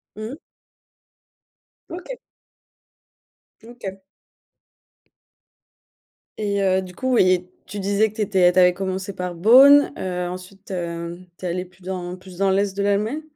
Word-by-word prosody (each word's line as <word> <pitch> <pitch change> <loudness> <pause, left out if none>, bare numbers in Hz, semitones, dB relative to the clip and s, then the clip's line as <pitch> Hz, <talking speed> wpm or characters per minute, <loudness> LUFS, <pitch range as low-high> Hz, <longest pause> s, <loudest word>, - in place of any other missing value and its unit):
Mmh. 215 +5 -6 1.5
OK. 365 +9 -7 1.4
OK. 220 -5 -9 2.4
Et 200 -1 -1
heu, 190 0 +2
du 180 -1 -11
coup 260 0 -1
ouais, 185 -5 +3 0.2
tu 205 - -6
disais 200 +2 +1
que 215 - -18
tu - - -3
étais 185 -3 +3
tu - - -6
avais 180 0 +6
commencé 190 +1 -4
par 180 -1 -5
Bonn, 265 +10 +7
heu, 180 -1 -3
ensuite, 185 +2 -10
heu, 170 -1 -5 0.2
tu 185 - -8
es - - -1
allée 180 +1 -2
plus 180 +1 -22
dans 180 -1 -5
plus 185 -1 -14
dans 195 0 +2
l'est 195 0 +1
de 200 - -2
l'Allemagne? 210 +8 0
190 Hz, 140 wpm, -22 LUFS, 180-210 Hz, 2.4 s, Bonn